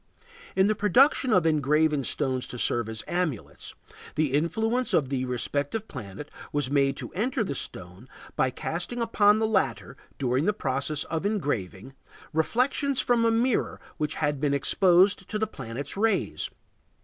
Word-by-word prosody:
In 190 - +4
the 215 - +3
production 250 - +4
of 185 -5 +4
engraved 150 -1 +2
stones 130 -3 -1
to 125 - -7
serve 120 -1 0
as 110 -1 -5
amulets, 135 - -3 0.4
the 150 -4 0
influence 220 - +1
of 140 -5 +1
the 130 -2 -1
respective 145 - -2
planet 115 +2 -8 0.2
was 145 -2 -1
made 140 -1 +2
to - - -7
enter 235 +5 0
the 165 - -3
stone 95 -1 -6 0.3
by 130 - +2
casting 175 - -4
upon 215 -2 +4
the 220 - +1
latter, 200 -10 0 0.2
during 130 +2 0
the 210 - +2
process 140 -2 -1
of 160 +1 -3
engraving, 135 - -2 0.4
reflections 250 - +1
from 240 -1 +2
a - - +4
mirror 230 +2 +1 0.2
which 150 -2 -2
had 145 -3 -1
been 145 -2 +2
exposed 185 +5 +3
to 215 - -2
the 220 - +1
planet's 135 - -6
rays. 215 0 0
155 Hz, 155 wpm, -27 LUFS, 135-210 Hz, 0.4 s, In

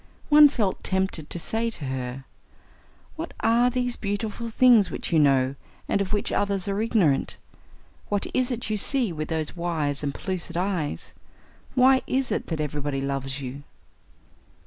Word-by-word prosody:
One 295 0 +9
felt 215 -9 -1
tempted 190 -5 -1
to - - -2
say 225 +7 0
to 165 -10 -6
her: 130 0 -4 0.9
"What 330 +1 -6
are 235 +2 +4
these 245 -1 -1
beautiful 215 +3 -3
things 230 -4 +5
which - - -4
you 160 - +5
know, 135 -2 +3 0.3
and 200 - +1
of 190 - -3
which 205 -1 -1
others 200 -1 0
are 200 +1 -1
ignorant? 195 -11 +2 0.7
What 205 -1 0
is 255 -1 +1
it 240 -3 -3
you 215 - +1
see 240 -2 0
with 155 -1 -4
those 160 0 -3
wise 160 -5 -1
and 145 - 0
pellucid 170 +2 -4
eyes? 180 -5 -2 0.6
Why 260 0 +5
is 265 0 0
it - - -2
that 160 -2 -3
everybody 145 -1 -2
loves 135 0 -3
you?" 135 +2 -6
190 Hz, 160 wpm, -25 LUFS, 145-230 Hz, 0.9 s, One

